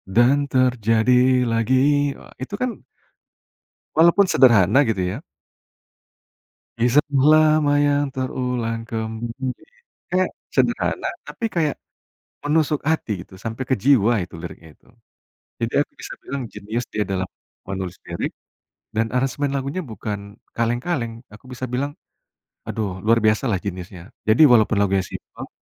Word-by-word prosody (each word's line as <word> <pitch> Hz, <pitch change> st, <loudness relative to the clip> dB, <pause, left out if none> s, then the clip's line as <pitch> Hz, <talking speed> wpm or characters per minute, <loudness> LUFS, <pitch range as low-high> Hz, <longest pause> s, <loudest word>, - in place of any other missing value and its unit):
"Dan 140 Hz, +4 st, +4 dB
terjadi 125 Hz, +1 st, +3 dB
lagi," 130 Hz, +5 st, +2 dB
wah, -, -, -15 dB
itu 135 Hz, +10 st, -4 dB
kan 255 Hz, -, +1 dB, 1.3 s
walaupun 170 Hz, +5 st, +6 dB
sederhana 115 Hz, 0 st, +5 dB
gitu 95 Hz, -4 st, 0 dB
ya. 95 Hz, +10 st, -4 dB, 1.6 s
"Kisah 125 Hz, +6 st, +4 dB, 0.2 s
lama 155 Hz, -1 st, +5 dB
yang 145 Hz, 0 st, +2 dB
terulang 125 Hz, -3 st, -2 dB
kembali," 115 Hz, +3 st, -4 dB, 0.6 s
kayak 185 Hz, 0 st, +1 dB, 0.2 s
sederhana, -, -, +1 dB, 0.2 s
tapi 235 Hz, -, -7 dB
kayak 155 Hz, -4 st, +1 dB, 0.7 s
menusuk 150 Hz, 0 st, +1 dB
hati 155 Hz, -9 st, 0 dB
gitu, 95 Hz, -, -16 dB
sampai 115 Hz, +4 st, -4 dB
ke -, -, +5 dB
jiwa 120 Hz, -5 st, +5 dB
itu 85 Hz, -, -16 dB
liriknya 85 Hz, -1 st, -9 dB
gitu. -, -, -31 dB, 0.7 s
Jadi 115 Hz, 0 st, -2 dB
aku -, -, -4 dB
bisa -, -, -7 dB
bilang 140 Hz, 0 st, -4 dB
jenius 115 Hz, +4 st, -4 dB
dia 105 Hz, -, +1 dB
dalam 95 Hz, -1 st, -1 dB, 0.4 s
menulis 95 Hz, -2 st, -4 dB
lirik 85 Hz, 0 st, -3 dB, 0.6 s
dan 115 Hz, +1 st, +1 dB
aransemen 135 Hz, +2 st, 0 dB
lagunya 140 Hz, +7 st, -2 dB
bukan 105 Hz, -3 st, -5 dB, 0.4 s
kaleng-kaleng 120 Hz, +2 st, -1 dB, 0.2 s
aku 105 Hz, -, -16 dB
bisa 130 Hz, +1 st, -4 dB
bilang 140 Hz, +3 st, -2 dB, 0.7 s
aduh 100 Hz, -4 st, -3 dB
luar 115 Hz, +2 st, +4 dB
biasa 110 Hz, +4 st, +3 dB
lah 95 Hz, -, +1 dB
jeniusnya, 90 Hz, -2 st, -6 dB, 0.3 s
jadi 110 Hz, +8 st, +5 dB
walaupun 110 Hz, -2 st, +4 dB
lagunya 95 Hz, -1 st, +2 dB
simpel -, -, -9 dB
120 Hz, 125 wpm, -22 LUFS, 110-140 Hz, 1.6 s, walaupun